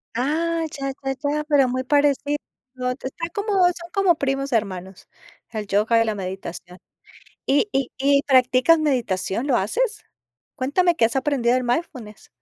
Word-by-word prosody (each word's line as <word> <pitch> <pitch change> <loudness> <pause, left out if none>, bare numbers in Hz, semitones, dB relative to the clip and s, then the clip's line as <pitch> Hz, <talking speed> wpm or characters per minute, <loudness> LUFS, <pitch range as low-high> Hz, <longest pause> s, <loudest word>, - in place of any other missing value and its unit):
Ah, 325 +6 0 0.2
ya, 275 0 -2
ya, 270 0 -1
ya. 295 +1 0
Pero 285 -3 +4
muy 255 +1 -2
parecido, 290 +1 +2 0.7
está 335 +6 -5
como 410 +1 -2
son 345 -1 -1
como 390 -3 +3
primos 275 -1 -2
hermanos, 190 -5 -3 0.4
el 215 -2 -5
yoga 215 +3 +2
y - - +2
la 220 -1 -1
meditación. 185 -2 -7 0.7
Y 285 +9 +2
y 270 -2 0
y, 280 +1 +3
¿practicas 255 +4 +5
meditación, 240 - -1
lo 255 -4 +3
haces? 425 - -1 0.5
Cuéntame 340 +7 +1
qué 230 - +3
has 230 - -2
aprendido 265 -3 +1
del 255 - 0
mindfulness. 245 -5 -4
270 Hz, 150 wpm, -22 LUFS, 230-300 Hz, 0.7 s, practicas